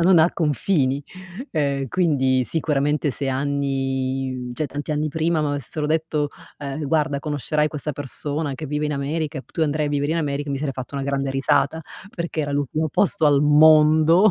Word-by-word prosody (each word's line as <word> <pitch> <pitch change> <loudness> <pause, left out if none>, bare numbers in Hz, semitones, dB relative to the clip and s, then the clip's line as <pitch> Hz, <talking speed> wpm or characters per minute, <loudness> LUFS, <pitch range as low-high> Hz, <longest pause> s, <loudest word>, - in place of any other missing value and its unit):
non 175 +1 +6
ha 160 +2 +5
confini. 145 - 0 0.5
Ehm, 140 -3 0
quindi 130 -6 +2
sicuramente 150 0 0
se 135 +1 -3
anni 135 -1 -1
mhmm, 125 -1 -6
cioè 155 +5 -2
tanti 145 +2 -4
anni 150 +1 0
prima 160 +2 0
m'avessero 145 0 -2
detto: 155 -1 0 0.3
"Ehm, 145 +1 -4
guarda 150 -1 +1
conoscerai 150 0 -1
questa 150 0 -4
persona 145 +1 -4
che 155 +4 -6
vive 150 +1 -2
in 150 - -1
America 150 +2 -2
e - - -7
p - - -28
tu 165 - -1
andrai 150 0 +1
a - - -1
vivere 145 +1 0
in 165 - 0
America," 145 -2 -2
mi 140 - -1
sarei 140 -1 -3
fatta 130 +2 -7
una 135 - -2
grande 140 -1 -1
risata, 140 +3 +1 0.3
perché 170 -2 -3
era 145 -1 -3
l'ultimo 145 +3 -1
posto 200 +1 +1
al 145 -2 +5
mondo 155 +5 +6
145 Hz, 185 wpm, -22 LUFS, 140-155 Hz, 0.5 s, non